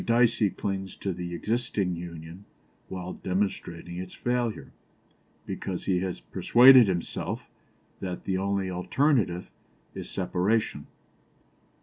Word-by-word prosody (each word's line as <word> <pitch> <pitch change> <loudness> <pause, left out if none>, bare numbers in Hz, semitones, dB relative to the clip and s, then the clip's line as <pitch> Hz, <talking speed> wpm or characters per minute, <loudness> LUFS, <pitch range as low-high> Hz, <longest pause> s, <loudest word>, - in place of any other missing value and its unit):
Dicey 115 -3 +3
clings 95 0 -4
to 95 - -3
the 85 0 -5
existing 105 -3 -1
Union 85 +2 -8 0.4
while 90 -1 -5
demonstrating 90 -2 -3
its 90 0 -7
failure, 120 -2 -1 0.7
because 95 -2 -4
he 90 -2 +1
has 95 -1 -3
persuaded 125 -1 +7
himself 90 -3 -3 0.5
that 90 -2 -5
the 95 - -1
only 95 0 0
alternative 90 - +1 0.4
is - - -7
separation. 95 +4 0
95 Hz, 105 wpm, -27 LUFS, 90-110 Hz, 0.7 s, persuaded